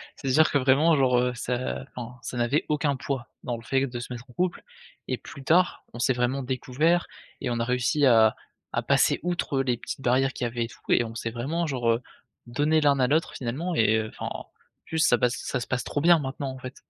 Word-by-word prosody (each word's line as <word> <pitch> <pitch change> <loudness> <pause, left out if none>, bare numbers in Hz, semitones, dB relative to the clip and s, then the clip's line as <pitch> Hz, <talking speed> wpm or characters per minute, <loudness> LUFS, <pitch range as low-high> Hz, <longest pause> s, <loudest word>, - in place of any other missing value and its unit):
c'est 135 - -7
à - - +2
dire 155 +3 +5
que, 145 - +2
vraiment, 140 +5 +4
genre, 125 -3 +3
heu, 125 0 +1
ça 125 +2 -3
enfin, 125 0 -7
ça 125 - -5
n'avait 120 +5 +1
aucun 150 -2 +1
poids 130 -2 -4 0.2
dans 120 - -2
le - - -11
fait 135 +2 +1
de 120 -2 -5
se 120 - -8
mettre 125 +1 -7
en 125 - -17
couple 180 +6 -1 0.4
et - - -1
plus 140 - -11
tard 175 +4 +3
on 120 - -8
s'est 130 +1 +2
vraiment 125 +3 0
découverts 135 +7 0 0.3
et 130 - -2
on 120 - -1
a 115 - 0
réussi 125 +4 +1
à 110 -2 +5 0.4
à - - +1
passer - - +3
outre 175 -6 0
les 125 -3 0
petites 130 - -7
barrières 130 +1 +2
qu'il - - -5
y - - +1
avait 120 0 -2
et - - -6
tout - - -15
et - - +4
on 115 -1 -7
s'est 115 - -3
vraiment, 150 +9 -2
genre, 125 -5 -2
heu, 115 - 0 0.5
donnés 150 +6 +2
l'un 140 -2 +3
à 130 - +4
l'autre, 155 +4 +1
finalement 150 +9 -3
et 110 -3 +4
heu, 110 -1 -2
enfin, - - -8
en - - -8 0.4
plus 160 - -3
ça 135 -6 +5
passe 125 +1 +1
ça - - -3
se 120 - -6
passe 130 -2 -1
trop 145 - -2
bien, 170 +2 +6
maintenant, 135 0 -4
en 130 - -9
fait. 130 0 -8
130 Hz, 250 wpm, -26 LUFS, 120-145 Hz, 0.5 s, bien